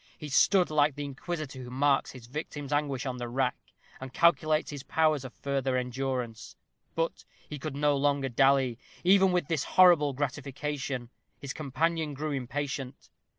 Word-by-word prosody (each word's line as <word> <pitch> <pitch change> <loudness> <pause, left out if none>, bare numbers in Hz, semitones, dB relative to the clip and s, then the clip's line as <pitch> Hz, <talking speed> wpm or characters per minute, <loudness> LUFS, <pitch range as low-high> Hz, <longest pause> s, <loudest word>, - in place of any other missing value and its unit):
He 150 - -7
stood 180 +6 +4
like 150 -2 +3
the 145 - -4
inquisitor 140 -1 -5
who 125 - -8
marks 135 +2 +2
his 125 -3 -11
victim's 145 +2 -5
anguish 145 -3 -1
on 130 -2 -3
the 120 -1 -4
rack, 130 +1 0 0.4
and 130 -1 -7
calculates 155 0 +2
his 145 -2 -6
powers 155 -1 +1
of 130 - -7
further 135 -1 -1
endurance. 125 -2 -3 0.4
But 165 0 -2 0.2
he 150 - -7
could 150 0 -5
no 145 0 +2
longer 140 -1 +1
dally, 130 -1 +3 0.2
even 190 +1 +5
with 180 -5 0
this 155 -4 0
horrible 170 -6 +5
gratification. 135 -2 -4 0.3
His 140 -1 -6
companion 155 +1 -1
grew 150 +2 -3
impatient. 135 0 -4
140 Hz, 155 wpm, -29 LUFS, 130-150 Hz, 0.4 s, even